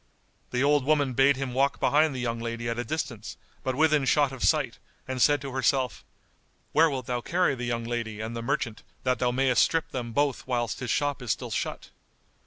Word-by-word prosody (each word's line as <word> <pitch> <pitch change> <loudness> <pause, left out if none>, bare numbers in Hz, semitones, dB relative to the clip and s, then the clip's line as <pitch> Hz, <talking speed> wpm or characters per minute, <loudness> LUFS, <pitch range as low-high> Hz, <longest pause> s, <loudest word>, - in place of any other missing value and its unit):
The 125 +2 0
old 145 -1 +3
woman 145 -2 +2
bade 135 +3 +4
him 135 -2 -3
walk 135 +2 +1
behind 150 -1 +3
the - - -4
young 115 -1 -2
lady 115 0 -4
at 115 0 -2
a - - -1
distance 125 -5 -4 0.3
but 130 - -1
within 155 -1 +3
shot 145 0 +3
of 135 -2 -6
sight - - +2 0.3
and 130 -1 -3
said 145 +1 +4
to 140 -1 -6
herself, 130 -1 0 0.7
"Where 160 +1 +5
wilt 130 -4 -4
thou 120 -1 -2
carry 175 +1 +1
the 125 -2 -4
young 120 -1 -2
lady 115 -2 -4
and 110 +2 -4
the 115 - -3
merchant 115 -1 -2 0.2
that 125 -3 +1
thou 125 - +2
mayest 130 0 +3
strip 165 -1 +1
them 120 -2 -4
both 140 +1 0
whilst 120 -3 -1
his 125 -2 -4
shop 145 -2 0
is 125 - -7
still - - -2
shut?" - - -4
130 Hz, 210 wpm, -27 LUFS, 120-140 Hz, 0.7 s, Where